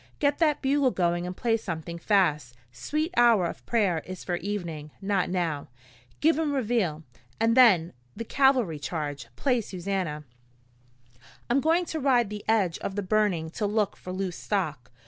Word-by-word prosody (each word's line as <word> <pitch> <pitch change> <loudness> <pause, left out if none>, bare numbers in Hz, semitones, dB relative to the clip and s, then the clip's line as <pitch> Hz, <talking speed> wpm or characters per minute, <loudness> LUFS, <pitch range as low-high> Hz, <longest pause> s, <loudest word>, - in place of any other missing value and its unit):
Get 285 -1 +1
that 305 -4 +2
bugle 275 0 +3
going 175 -4 0
and 180 - -6
play 230 -2 +1
something 170 -5 -6
fast 150 - +1 0.2
Sweet 305 - -3
Hour 235 -6 +5
of 170 - -5
Prayer 195 -8 +1
is 185 0 -8
for 175 - -2
evening, 170 -6 -5
not 195 -2 0
now. 170 -5 -2 0.5
Give 320 +1 +3
'em 305 -3 0
Reveille, 215 - 0 0.4
and 225 +1 +3
then 195 -10 +5 0.2
the 230 - -4
cavalry 255 - +2
charge. 145 -4 -4
Play 250 - +1
Susannah. 185 -6 -3 1.3
"I'm 270 +3 +3
going 330 +4 +2
to 320 - -4
ride 245 -6 +2
the 210 -1 -6
edge 200 -7 +2
of 195 - -4
the 205 - -2
burning 185 -5 +1
to 210 +4 -2
look 210 -1 0
for 180 - -9
loose 185 -1 -3
stock. 155 - -2
195 Hz, 165 wpm, -27 LUFS, 170-240 Hz, 1.3 s, Hour